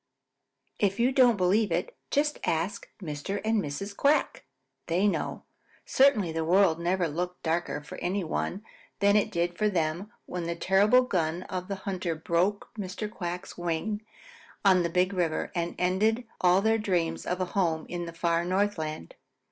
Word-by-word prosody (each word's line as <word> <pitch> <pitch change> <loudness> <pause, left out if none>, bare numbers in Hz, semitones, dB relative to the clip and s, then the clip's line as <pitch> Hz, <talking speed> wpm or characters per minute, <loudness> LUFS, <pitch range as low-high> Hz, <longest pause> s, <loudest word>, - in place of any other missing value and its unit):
If 200 +1 +1
you 245 +3 +3
don't 250 -4 +5
believe 195 +2 +2
it, 170 +2 -1
just 295 +1 +1
ask 170 +5 -1
Mr. 155 +6 -4
and 220 -1 +2
Mrs. 195 +7 -5
Quack. 285 +6 +1 0.4
They 180 +5 +2
know. 200 - -2 0.4
Certainly 255 - +4
the 160 0 -1
world 175 0 +4
never 175 +1 +1
looked 180 +4 -4
darker 165 -2 -1
for - - -9
any 190 +2 -1
one 180 +4 -3 0.3
than 200 0 +4
it 210 - +3
did 175 0 -1
for 215 0 +3
them 175 +2 -1
when 180 -1 -4
the 170 0 -2
terrible 205 +8 +4
gun 175 -6 -1
of 185 0 -5
a 200 - -1
hunter 185 -3 -3
broke 170 +6 0
Mr. 205 +2 -4
Quack's 180 -1 -6
wing 175 +5 -2 0.6
on 185 -2 +6
the 170 - 0
Big 180 +3 +1
River 170 -4 -1
and 170 -1 -2
ended 215 +7 +1 0.2
all 180 +2 +4
their 220 0 +3
dreams 175 -6 -1
of 180 - -1
a 185 - +1
home 165 -5 +1
in 175 -1 -4
the 170 - -7
far 170 0 +1
Northland. 175 - -1
180 Hz, 165 wpm, -28 LUFS, 170-205 Hz, 0.6 s, on